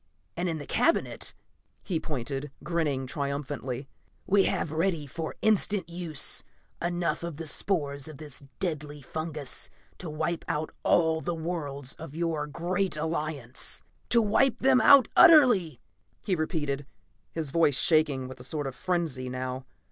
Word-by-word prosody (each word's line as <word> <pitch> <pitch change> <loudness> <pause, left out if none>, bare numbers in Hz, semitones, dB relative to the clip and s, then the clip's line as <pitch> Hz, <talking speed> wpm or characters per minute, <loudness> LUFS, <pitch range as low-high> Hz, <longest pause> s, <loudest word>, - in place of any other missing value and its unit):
And 175 +1 -1
in 165 - -2
the 145 - -7
cabinet," 335 - +1 0.5
he 175 -5 -1
pointed 140 -1 -4
grinning 150 -6 0
triumphantly 140 -1 -3 0.4
"we 195 0 +4
have, 155 - 0
ready 165 -1 0
for 160 +3 -5
instant 210 -2 +3
use, 170 -4 -1 0.4
enough 175 0 -1
of 170 -3 -5
the 165 - -5
spores 145 -4 -1
of 155 -3 -9
this 145 -2 -7 0.2
deadly 150 -5 -3
fungas 155 -3 -5 0.3
to 175 - -5
wipe 160 +2 -2
out 155 +1 -2
all 160 -1 +3
the 175 0 -2
worlds 145 -5 -4
of 160 -3 -10
your 165 -3 -1
great 175 +3 -1
Alliance. 150 -5 -3 0.3
"To 235 -1 +5
wipe 240 +4 +3
them 260 0 +4
out 280 -3 +8
utterly!" 255 - +7 0.4
he 190 - +1
repeated, 145 -4 -2 0.4
his 155 -4 -3
voice 150 -4 +4
shaking 150 -5 +3
with 130 0 -10
a - - -9
sort 145 +2 -2
of 135 - -3
frenzy 155 -6 -2
now. 130 +1 -4
155 Hz, 145 wpm, -28 LUFS, 140-175 Hz, 0.5 s, out